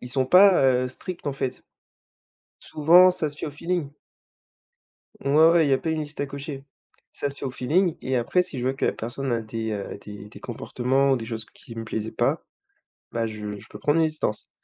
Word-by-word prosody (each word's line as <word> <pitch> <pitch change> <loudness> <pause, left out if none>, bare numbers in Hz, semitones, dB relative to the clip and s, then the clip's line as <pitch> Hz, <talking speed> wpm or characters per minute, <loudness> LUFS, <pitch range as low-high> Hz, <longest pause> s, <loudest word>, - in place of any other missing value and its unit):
ils 125 - -8
sont 130 0 +1
pas, 185 -2 +7 0.2
heu, 125 - -2
stricts, 170 +5 -8
en - - -1
fait. 135 -2 -4 1.0
Souvent, 175 +5 +6
ça 155 -4 -2
se 145 - -14
fait - - -4
au - - -4
feeling. 160 -1 -3 1.3
Ouais, 155 +4 +6
ouais, 165 -2 +4
il - - +1
y - - +5
a - - +4
pas 160 - -3
une 160 -1 0
liste 150 0 -9
à 145 - -1
cocher. 140 0 -7 0.5
Ça 145 - -3
se - - -12
fait - - -6
au 130 - -1
feeling 165 +8 +1
et 130 0 -1
après, 150 +10 +2
si 180 -6 -7
je 120 - -3
vois 130 - +1
que - - -1
la - - +2
personne 120 +3 -4
a 115 - 0
des, 110 0 -4
heu, 100 -1 -5
des 105 -1 -9
des 110 - -12
comportements 130 +3 0
ou 130 - +3
des 115 - -6
choses 110 -1 -5
qui 115 - -14
me 115 - -5
plaisaient 110 0 -4
pas, - - 0 0.7
bah, 115 -1 -1
je 105 -1 -6
je - - -14
peux - - -9
prendre 150 +2 +2
mes 160 - +4
distances. 155 -9 -3
135 Hz, 230 wpm, -25 LUFS, 115-155 Hz, 1.3 s, pas